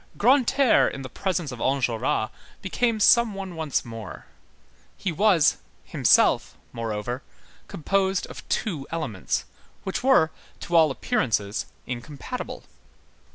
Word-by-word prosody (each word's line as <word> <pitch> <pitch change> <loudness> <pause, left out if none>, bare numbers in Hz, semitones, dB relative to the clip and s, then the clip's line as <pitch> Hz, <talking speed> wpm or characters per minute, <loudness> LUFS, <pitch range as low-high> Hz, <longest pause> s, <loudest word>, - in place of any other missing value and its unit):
Grantaire 260 +1 +4
in 135 - -7
the 130 - -7
presence 180 -7 -2
of 125 - -8
Enjolras 120 -4 0 0.3
became 225 +4 0
some 235 0 +5
one 190 -3 -6
once 160 -4 -1
more. 115 -2 -8 0.7
He 190 - -2
was, 170 -3 +4 0.3
himself, - - +3 0.2
moreover, 115 +2 -3 0.5
composed 190 +3 0
of - - -11
two 160 - -2
elements, 150 - -2 0.4
which 190 - -3
were, 255 -12 +4 0.3
to 175 - -3
all 160 -2 +6
appearance, 110 -5 -1 0.2
incompatible. 140 - -6
160 Hz, 110 wpm, -25 LUFS, 125-195 Hz, 0.7 s, all